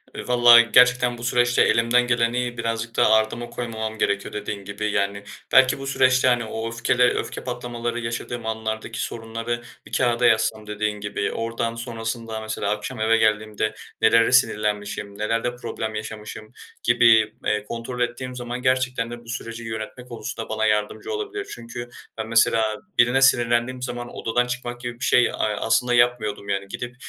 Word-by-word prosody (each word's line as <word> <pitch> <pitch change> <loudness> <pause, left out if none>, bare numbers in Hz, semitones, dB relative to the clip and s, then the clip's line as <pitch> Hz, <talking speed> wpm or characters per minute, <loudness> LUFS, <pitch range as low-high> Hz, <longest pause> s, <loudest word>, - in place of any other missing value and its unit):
E, - - -5
vallahi 120 -1 +7
gerçekten 125 -1 +5
bu 120 - -10
süreçte 120 0 +2
elimden 120 +2 +3
geleni 120 +1 0
birazcık 115 0 -3
daha - - +4
ardıma 110 +2 +1
koymamam 110 -2 -5
gerekiyor 100 -1 -1
dediğin 105 -1 -5
gibi. 105 +1 -3
Yani, 100 0 -1 0.3
belki 130 0 +5
bu 135 - -6
süreçte, 130 -1 +3
hani, 120 -2 +2
o 110 +1 -4
öfkeli 120 +1 +1
öfke 125 - 0
patlamaları 120 -1 -4
yaşadığım 115 0 -5
anlardaki 110 +1 -4
sorunları 115 +1 -4 0.2
bir - - -15
kâğıda 120 -1 +2
yazsam 110 -1 +2
dediğin 105 0 -2
gibi, 100 0 -2
oradan 115 0 -3
sonrasında 115 -1 -5
mesela 110 -2 -3
akşam 115 +3 -4
eve 115 +1 +3
geldiğimde 110 0 0 0.3
nelere 115 +1 +5
sinirlenmişim, 105 -4 0
nelerde 115 +3 -1
problem 110 -3 -5
yaşamışım 110 0 -7 0.3
gibi, 115 -2 +5
eee, 105 -1 0
kontrol 120 +3 -6
ettiğim 125 +1 -3
zaman 120 0 -5
gerçekten 130 -2 0
de 120 - -7
bu 115 - -15
süreci 115 -1 -6
yönetme 110 +2 -6
konusunda 115 -2 -6
bana 110 0 0
yardımcı 105 - -1
olabilir. 410 -2 -4
Çünkü 120 +1 -8 0.3
ben 110 0 -4
mesela 115 0 +3 0.3
birine 120 +2 +4
sinirlendiğim 120 -1 +3
zaman 120 -1 -5
odadan 125 +2 0
çıkmak 120 0 -5
gibi 120 -1 -6
bir - - -2
şey, 125 - +5
eee, - - +1
aslında 110 +3 0
yapmıyordum 115 -4 +1
yani. 100 0 -2
Gidip 125 +5 -6
115 Hz, 160 wpm, -23 LUFS, 110-120 Hz, 0.3 s, vallahi